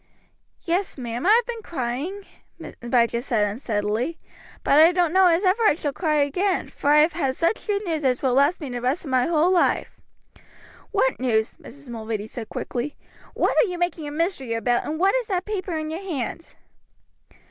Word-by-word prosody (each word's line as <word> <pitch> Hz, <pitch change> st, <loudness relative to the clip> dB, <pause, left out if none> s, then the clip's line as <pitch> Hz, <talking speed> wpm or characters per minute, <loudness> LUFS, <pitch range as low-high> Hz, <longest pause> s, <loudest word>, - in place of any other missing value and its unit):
"Yes, 355 Hz, +1 st, -1 dB
ma'am, 240 Hz, +3 st, -3 dB
I -, -, +5 dB
have 460 Hz, +2 st, +5 dB
been 470 Hz, -2 st, -5 dB
crying," 315 Hz, -, -4 dB, 0.6 s
Abijah 235 Hz, -1 st, +1 dB
said 235 Hz, -5 st, +1 dB
unsteadily, 215 Hz, +6 st, -2 dB, 0.5 s
"but 285 Hz, -, +4 dB
I 325 Hz, +2 st, +8 dB
don't 350 Hz, -2 st, +1 dB
know 380 Hz, 0 st, +6 dB
as 340 Hz, +2 st, +3 dB
ever 380 Hz, +4 st, +2 dB
I 425 Hz, -9 st, +4 dB
shall 295 Hz, -3 st, -3 dB
cry 310 Hz, -2 st, 0 dB
again, 365 Hz, +7 st, -1 dB
for 285 Hz, -, -2 dB
I 300 Hz, +1 st, +7 dB
have 310 Hz, +1 st, +3 dB
heard 275 Hz, -6 st, -1 dB
such 335 Hz, +11 st, -1 dB
good 410 Hz, 0 st, -1 dB
news 320 Hz, -4 st, -2 dB
as 255 Hz, -1 st, +1 dB
will 260 Hz, -2 st, +2 dB
last 285 Hz, +7 st, +3 dB
me 290 Hz, -, -5 dB
the 245 Hz, -1 st, -4 dB
rest 265 Hz, +8 st, -1 dB
of 275 Hz, -, -6 dB
my 255 Hz, -1 st, +2 dB
whole 335 Hz, +1 st, +3 dB
life." 350 Hz, -, +1 dB, 0.9 s
"What -, -, +1 dB
news, 225 Hz, -4 st, +1 dB
Abijah?" -, -, -12 dB
Mrs. 280 Hz, -2 st, -15 dB
Mulready 220 Hz, -2 st, -4 dB
asked 220 Hz, +1 st, -8 dB
quickly. 260 Hz, +4 st, -4 dB, 0.4 s
"What -, -, +1 dB
are 475 Hz, -, +2 dB
you 360 Hz, -1 st, -4 dB
making 350 Hz, -3 st, -2 dB
a -, -, -5 dB
mystery 300 Hz, -6 st, -2 dB
about, 240 Hz, +1 st, 0 dB
and 310 Hz, +1 st, -3 dB
what 385 Hz, +2 st, +3 dB
is -, -, 0 dB
that 370 Hz, -2 st, -1 dB
paper 380 Hz, -5 st, -3 dB
in 310 Hz, 0 st, -4 dB
your 330 Hz, +4 st, -5 dB
hand?" 330 Hz, -, -5 dB
305 Hz, 200 wpm, -23 LUFS, 250-360 Hz, 0.9 s, I